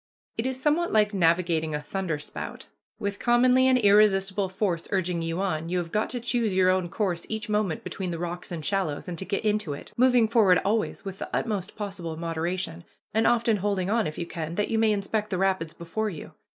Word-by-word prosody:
It 225 +3 -1
is 260 0 -3
somewhat 305 +5 +1
like 210 -1 +3
navigating 165 -3 +2
a - - -1
thunder 165 +2 -3
spout. 150 - -7 0.3
With 200 -2 -3
commonly 250 +2 +4
an 260 -1 +5
irresistible 200 -3 +4
force 185 -3 -1
urging 180 -3 0
you 165 +1 -2
on, 165 -4 -2
you 180 - 0
have 170 -2 -3
got 215 0 0
to 245 - -3
choose 235 -4 0
your 185 0 +5
own 185 -2 0
course 180 -3 -2
each 220 -1 -4
moment 210 -6 0
between 190 -2 -4
the 170 - -3
rocks 175 +1 -5
and 160 -3 -5
shallows, 190 -8 -1
and 175 - -4
to 190 - -4
get 200 +2 -2
into 210 -7 0
it, 140 - -10
moving 245 -2 +4
forward 215 -6 +5
always 215 +1 0
with 195 -1 -6
the - - -5
utmost 210 -4 -2
possible 190 -6 -5
moderation, 170 +1 -3 0.3
and 220 +1 +3
often 235 -2 +3
holding 195 -1 -1
on, 225 -1 +2
if 155 - -6
you 170 - -3
can, 165 -1 -5
that 210 - 0
you 225 - +1
may 220 -1 +4
inspect 210 +1 -1
the 185 - -1
rapids 190 -4 0
before 195 +7 -3
you. 165 -7 -8
195 Hz, 215 wpm, -26 LUFS, 170-215 Hz, 0.3 s, an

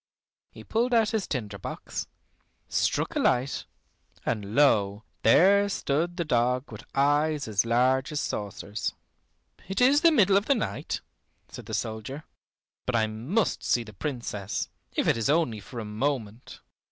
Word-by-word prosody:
He - - -12
pulled 240 +2 +1
out 220 -2 +3
his 220 -4 -1
tinder 105 -7 -4
box, - - -5 0.6
struck - - 0
a - - +1
light, 130 +3 +1 0.6
and 105 0 -2
lo! 105 -8 +3 0.2
there 200 - +5
stood 170 0 -1
the 170 - -1
dog 125 0 +1
with 110 0 -9
eyes 145 +1 +2
as 105 +1 +1
large 130 +4 +2
as 150 - -1
saucers. 105 -1 -4 0.7
"It 195 - -2
is 270 +4 +5
the 335 - +6
middle 200 - +5
of 200 - 0
the 280 - +4
night," 100 - -3 0.5
said - - -10
the - - -2
soldier, 110 +7 -4 0.6
"but 125 - 0
I 110 -1 +3
must 125 - -1
see 120 - +2
the 110 -2 -12
Princess, 105 -6 -4 0.3
if - - +1
it - - +3
is 115 +3 0
only 150 -8 +2
for 115 +4 -8
a 110 - -5
moment." 115 0 -3
130 Hz, 155 wpm, -27 LUFS, 110-170 Hz, 0.7 s, the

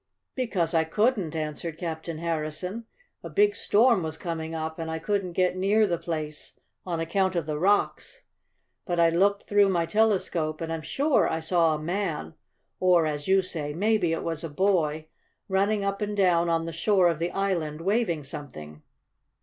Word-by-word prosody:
"Because 195 - -1
I 165 -1 +3
couldn't," 195 -1 0
answered 155 +1 -4
Captain 165 -1 -5
Harrison. 165 +6 -3 0.4
"A - - -7
big 410 0 +3
storm 230 -1 +3
was 160 -1 -4
coming 165 -1 -4
up, 160 +1 -4
and 165 0 -4
I 160 - -2
couldn't 185 +1 -2
get 180 0 +1
near 200 +4 +3
the 175 -4 -1
place 155 -3 -5 0.3
on 170 -2 -2
account 185 +3 0
of 170 -3 -1
the 150 -1 -3
rocks. 205 - 0 0.6
But 175 -2 -1
I 165 -1 +5
looked 200 +4 +2
through 205 -1 +3
my 170 -3 +1
telescope, 180 -7 +1
and 165 0 -3
I'm 165 - -4
sure 280 - +1
I 160 - -1
saw 165 -1 +2
a - - -5
man 185 +6 -3 0.5
or, 180 -3 +4
as 145 -1 -3
you 190 0 +4
say, 150 -5 -4
maybe 205 -2 +2
it 165 - -2
was 165 -1 -3
a 165 - -4
boy 155 -2 +1 0.4
running 200 +2 +1
up 200 +1 -2
and 210 0 -2
down 175 -3 +3
on 165 0 +1
the 165 - -5
shore 185 +2 +3
of 165 -3 0
the 170 +1 -1
island, 170 -6 -2
waving 190 -5 0
something. 75 - -8
170 Hz, 180 wpm, -26 LUFS, 160-200 Hz, 0.6 s, I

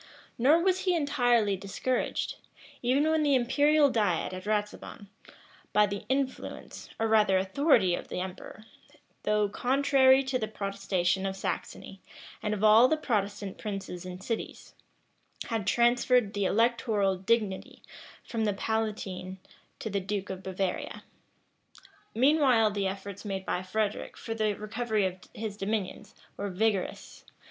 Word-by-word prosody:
Nor 300 +8 +5
was 375 0 +2
he 365 -2 +1
entirely 245 -9 +2
discouraged, 200 +7 -2 0.4
even 265 +5 +2
when 315 0 +2
the 290 -2 +3
imperial 285 +4 +3
diet 195 -7 0
at 185 +1 -7
Ratisbon, 210 -1 -3 0.6
by 210 0 +5
the 200 0 -5
influence, 265 0 -3
or 225 - +1
rather 210 -3 +4
authority 195 - +3
of - - -4
the - - -4
emperor, 190 +3 -7 0.6
though 210 0 +2
contrary 265 +3 +4
to 265 -1 -1
the 215 - -2
protestation 195 -3 -1
of 190 - -3
Saxony, 195 0 -5 0.4
and 210 0 -1
of 205 - -5
all 220 +3 +7
the 315 - +1
Protestant 205 -7 -2
princes 195 -4 -5
and 185 0 -8
cities, 230 +1 -5 0.8
had 225 -5 -2
transferred 240 -2 +3
the 205 -1 -1
electoral 225 -2 +2
dignity 195 0 -1 0.4
from 225 -2 -2
the 205 - +1
palatine 200 -3 -3 0.4
to 220 - -5
the 200 - 0
duke 200 +1 -3
of 190 0 -6
Bavaria. 190 -1 -3 1.1
Meanwhile 255 -4 +4
the 200 -1 -1
efforts 195 +1 -6
made 195 -2 -4
by 180 - -1
Frederic 205 +3 -3
for 225 - -5
the 215 -2 0
recovery 215 0 -1
of 185 0 -3 0.2
his 215 -2 -4
dominions, 205 -1 -3 0.2
were 200 0 -3
vigorous. 200 0 -2
210 Hz, 135 wpm, -29 LUFS, 195-245 Hz, 1.1 s, all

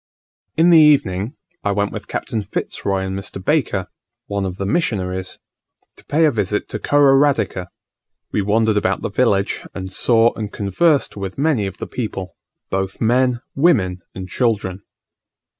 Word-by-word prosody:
In 170 +2 +5
the 165 - +8
evening 120 -9 +3 0.3
I 100 - +1
went 100 +1 0
with - - -7
Captain 110 - -3
Fitz - - -5
Roy 95 -1 0
and 95 0 -3
Mr. 95 0 -5
Baker, 105 - 0 0.4
one 100 -1 -2
of 90 0 -6
the 100 - -3
missionaries, 95 - -1 0.6
to - - -17
pay 160 +2 +2
a 150 - +4
visit 105 -3 -1
to - - -4
Kororadika: 140 -9 +3 0.6
we 105 - 0
wandered 110 +2 +2
about 105 +2 0
the - - -2
village, 100 -4 +1
and 95 0 -5
saw 115 +1 +4
and 105 -2 -5
conversed 135 - +1
with 95 -1 -5
many 140 -8 +1
of 95 - -8
the - - -5
people, 95 - -5 0.4
both 95 0 -2
men, 125 +1 +2
women, 115 - +2 0.2
and 95 0 -6
children. 100 -5 -1
105 Hz, 160 wpm, -20 LUFS, 95-130 Hz, 0.6 s, the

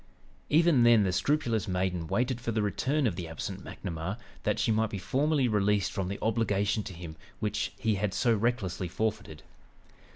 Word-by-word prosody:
Even 160 -3 +5
then 120 -2 +6
the 95 - +1
scrupulous 120 -3 +1
maiden 90 -2 -1
waited 125 +5 0
for 115 - -2
the 110 -1 0
return 135 +8 0
of 105 -8 +1
the 90 -2 -5
absent 80 -2 -6
McNamar, 85 +5 -5 0.2
that - - 0
she - - +1
might 110 0 +2
be 100 - -4
formally 140 - +1
released 105 -2 +2
from 95 -3 -2
the 100 +2 -3
obligation 105 -2 +1
to 100 -2 -7
him 85 -2 -8 0.2
which 105 -1 -1
he 110 -1 +1
had 105 -2 +1
so 120 +4 +3
recklessly 105 -5 -1
forfeited. 105 -5 -3
105 Hz, 175 wpm, -29 LUFS, 95-120 Hz, 0.2 s, then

